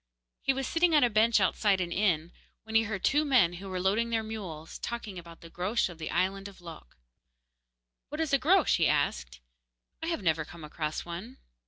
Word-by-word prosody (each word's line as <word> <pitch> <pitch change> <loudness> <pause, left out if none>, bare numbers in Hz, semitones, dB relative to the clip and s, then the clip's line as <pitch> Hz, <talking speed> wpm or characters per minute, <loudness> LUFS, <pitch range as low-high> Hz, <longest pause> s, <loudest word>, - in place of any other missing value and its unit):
He - - +2
was 270 0 -2
sitting 330 +3 +2
on 295 - +6
a 240 - +3
bench 220 +1 +4
outside 195 0 +2
an 175 -1 -2
inn, 175 -4 +1 0.3
when 220 0 -9
he 225 0 +4
heard 205 -3 -4
two 295 +2 +3
men 250 - +4
who 190 +3 -8
were 185 -1 -3
loading 205 +5 +1
their 225 -1 0
mules 185 -8 -7
talking 220 -6 -5
about 170 -1 -13
the 165 - -11
Groac'h 190 +6 0
of 170 -2 -11
the 155 - -4
island 195 +1 0
of 195 -2 -13
Lok. 165 - -12 1.1
'What 300 +2 -6
is 320 -3 -1
a 275 - +5
Groac'h?' 345 +5 +4
asked - - 0
he. - - -20 0.6
'I 325 - -3
have 330 - -2
never 160 -2 +2
come 165 +1 -12
across 150 0 -4
one. 185 +10 -7
195 Hz, 205 wpm, -29 LUFS, 170-235 Hz, 1.1 s, on